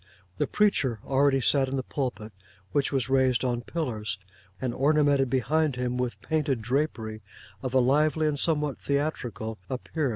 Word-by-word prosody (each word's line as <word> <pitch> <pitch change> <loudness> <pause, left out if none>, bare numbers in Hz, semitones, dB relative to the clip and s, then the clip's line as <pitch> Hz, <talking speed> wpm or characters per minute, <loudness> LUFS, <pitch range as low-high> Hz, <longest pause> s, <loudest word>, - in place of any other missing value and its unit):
The - - +1
preacher 145 - +2
already 135 0 +3
sat 135 +1 +3
in 135 - -2
the 130 - -1
pulpit, 125 -7 -4 0.4
which 140 -1 +1
was 135 -4 0
raised 130 -2 +2
on 120 -1 0
pillars, 115 - -3 0.4
and 125 -2 -2
ornamented 145 -1 +3
behind 145 +3 +1
him 125 0 -2
with 125 -1 -2
painted 150 -5 0
drapery 110 -3 -2 0.4
of 130 0 -3
a - - +7
lively 150 +5 +3
and 150 -2 0
somewhat 150 -3 0
theatrical 125 -6 -2
appearance. 140 +3 -2
135 Hz, 155 wpm, -27 LUFS, 125-150 Hz, 0.4 s, a